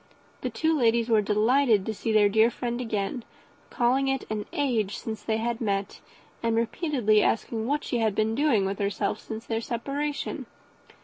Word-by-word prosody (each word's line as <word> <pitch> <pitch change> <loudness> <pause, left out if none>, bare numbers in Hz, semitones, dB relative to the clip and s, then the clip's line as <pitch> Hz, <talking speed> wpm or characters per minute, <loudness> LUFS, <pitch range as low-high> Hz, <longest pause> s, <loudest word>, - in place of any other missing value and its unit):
The - - -2
two 320 0 +1
ladies 235 -3 +2
were 220 -2 +4
delighted 215 +1 +3
to 220 - -2
see 220 +2 -3
their 215 -1 +5
dear 220 +3 +4
friend 240 0 -3
again, 220 0 -2 0.5
called 260 +3 +2
it 270 -1 -1
an 210 -1 -3
age 230 -8 0
since 220 -2 -6
they 220 +1 -1
had 235 +1 -2
met, 200 -2 -2 0.4
and 230 -1 +1
repeatedly 230 - +2
asked 225 - 0
what 245 +7 -1
she 240 - -1
had 220 -3 +1
been 220 +1 +1
doing 245 -6 +2
with 195 +1 -3
herself 200 +1 -1
since 220 0 -7
their 225 0 -2
separation. 280 +6 -3
225 Hz, 175 wpm, -27 LUFS, 215-250 Hz, 0.5 s, their